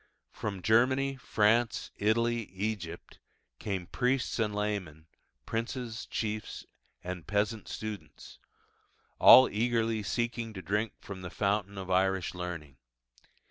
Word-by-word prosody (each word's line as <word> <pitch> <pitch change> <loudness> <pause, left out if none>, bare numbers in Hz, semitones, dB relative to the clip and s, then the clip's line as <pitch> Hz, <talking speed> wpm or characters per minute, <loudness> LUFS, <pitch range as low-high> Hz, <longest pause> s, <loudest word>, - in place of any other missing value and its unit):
From 100 -4 -5
Germany, 130 +5 +3
France, 115 -1 +1
Italy, 115 +2 +1
Egypt, 95 -4 -5 0.4
came 100 -4 -3
priests 125 +6 0
and 105 -2 0
laymen, 100 -7 -3 0.4
princes, 115 0 -4
chiefs, 110 -1 -4 0.4
and 90 -1 -6
peasant 105 +2 0
students 110 -2 -7 0.8
all 130 0 +10
eagerly 115 0 0
seeking 115 +1 -2
to 95 - -7
drink 105 +5 -1
from 95 -2 -8
the 90 - -6
fountain 100 0 -1
of 95 -1 -5
Irish 95 0 +2
learning. 85 -6 -6
105 Hz, 110 wpm, -30 LUFS, 95-115 Hz, 0.8 s, all